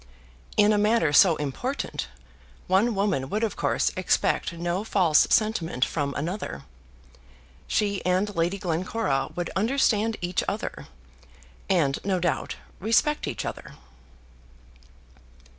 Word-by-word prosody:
In 210 +1 +5
a 210 - +2
matter 210 -7 +2
so 170 +2 +7
important, 150 - -3 0.6
one 205 +5 +2
woman 195 -10 0
would 215 +6 -1
of 220 - -1
course - - 0
expect - - +1
no 175 +3 -2
false 180 -8 +3
sentiment 170 - +1
from 140 -3 -3
another. 155 - -4 1.0
She 200 -2 0
and 185 +3 0
Lady 170 +4 0
Glencora 170 -6 -1
would 175 -1 -3
understand 225 -1 +1
each 175 +1 -1
other; - - -4 0.8
and 155 -8 +2
no 190 -2 0
doubt, 170 -6 -1 0.2
respect 230 +9 +1
each - - -4
other. - - -7
185 Hz, 115 wpm, -26 LUFS, 165-210 Hz, 1.0 s, so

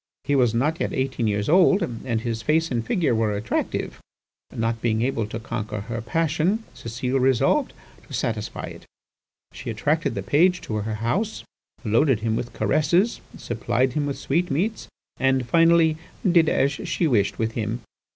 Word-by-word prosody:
He 145 - +1
was 120 -4 +3
not 150 +8 +1
yet - - -1
eighteen 130 -3 -1
years 105 -1 0
old, 185 +3 +5
and 120 -5 -3
his 115 -1 -3
face 160 +6 +1
and 120 -2 0
figure 155 - +1
were 110 -2 +1
attractive. 105 - -2 0.5
Not 115 0 -2
being 110 -1 +1
able 115 -4 -1
to 110 +1 -5
conquer 110 -2 -4
her 115 +2 -5
passion, 165 - 0
Cécile 125 +3 -2
resolved 130 -1 +2 0.4
to - - -12
satisfy - - -3
it. - - -9 0.7
She 120 - -7
attracted 150 +9 0
the - - -3
page 180 +5 +3
to 110 - -4
her 110 +1 -2
house, 180 - -2 0.4
loaded 115 +2 +3
him 110 0 0
with 120 +1 -3
caresses, 165 - +1 0.2
supplied 120 +2 -1
him 145 0 0
with 140 - -3
sweetmeats 175 +7 -1 0.3
and 130 -2 +1
finally 165 +2 +4 0.3
did 170 -3 +5
as 140 +1 +2
she 150 +4 -2
wished 105 -9 +2
with 110 0 -1
him. 115 +1 -3
125 Hz, 160 wpm, -24 LUFS, 115-160 Hz, 0.7 s, old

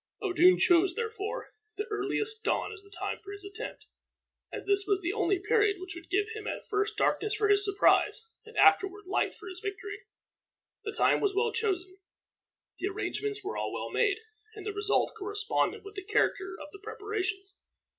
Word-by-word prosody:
Odun 365 -2 +5
chose, 355 0 +4
therefore, 445 +1 -4 0.2
the 420 - -1
earliest 425 +2 -1
dawn - - 0
as 420 - -10
the 400 - -19
time 400 - -4
for 400 - -8
his 405 -1 -8
attempt, 425 +5 -7 0.7
as - - -6
this 400 -1 +2
was 400 -2 +3
the 355 0 -2
only 395 -3 +2
period 415 0 +2
which 370 0 -6
would 345 -1 -11
give 405 +2 +2
him 435 -1 -6
at - - -4
first 410 0 0
darkness 430 0 +1
for 425 -1 +1
his 410 0 +6
surprise, 410 +2 +3 0.2
and 450 +1 -13
afterward 390 +1 +4
light 370 - 0
for - - -11
his 370 -1 -7
victory. 405 +1 -5 0.8
The 430 - -3
time 435 - +3
was 400 -2 +1
well 455 +3 +2
chosen, 380 -4 -1 0.8
the 385 - 0
arrangements 420 +1 -2
were 400 - -4
all - - -2
well - - -4
made, 405 -1 +2 0.4
and 415 - -9
the 420 - -2
result 415 0 +1
corresponded 415 +1 0
with 405 - -9
the 390 -2 -6
character 385 -2 +1
of 295 -1 -8
the 400 - -11
preparations. 395 -2 -4
405 Hz, 185 wpm, -30 LUFS, 390-425 Hz, 0.8 s, his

